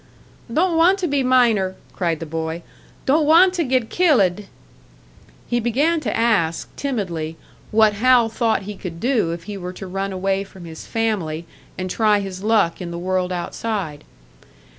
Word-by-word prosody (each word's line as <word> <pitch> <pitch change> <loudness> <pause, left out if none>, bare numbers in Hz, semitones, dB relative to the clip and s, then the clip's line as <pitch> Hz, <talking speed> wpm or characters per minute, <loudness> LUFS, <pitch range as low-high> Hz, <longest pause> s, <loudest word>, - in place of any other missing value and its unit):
"Don't 335 +6 +2
want 350 +4 +5
to 370 -3 -1
be 285 -2 +1
miner!" 235 -7 +3 0.2
cried 170 -4 -1
the 165 - -5
boy. 160 +1 -4 0.4
"Don't 295 +2 +3
want 355 +4 +6
to 350 -2 0
get 255 -4 0
kil 350 -4 +4
lid!" 195 0 +1 1.0
He 240 - 0
began 280 +9 +1
to - - -2
ask, 210 -9 +1
timidly, 175 - -3 0.3
what 215 -1 +4
Hal 240 +2 +4
thought 225 -2 0
he 205 +1 -6
could 175 -3 -7
do 235 -6 +1
if 170 0 -6
he 205 +3 -6
were 180 -1 -6
to 195 - -8
run 195 +1 -3
away 195 +1 -1
from 190 -2 -13
his 160 -1 -10
family 185 -8 -2 0.3
and 185 - -3
try 210 +2 +2
his 190 -2 -6
luck 205 -5 +2
in 175 - -5
the 170 - -5
world 185 +1 -1
outside. 180 -3 -4
205 Hz, 170 wpm, -21 LUFS, 180-250 Hz, 1.0 s, want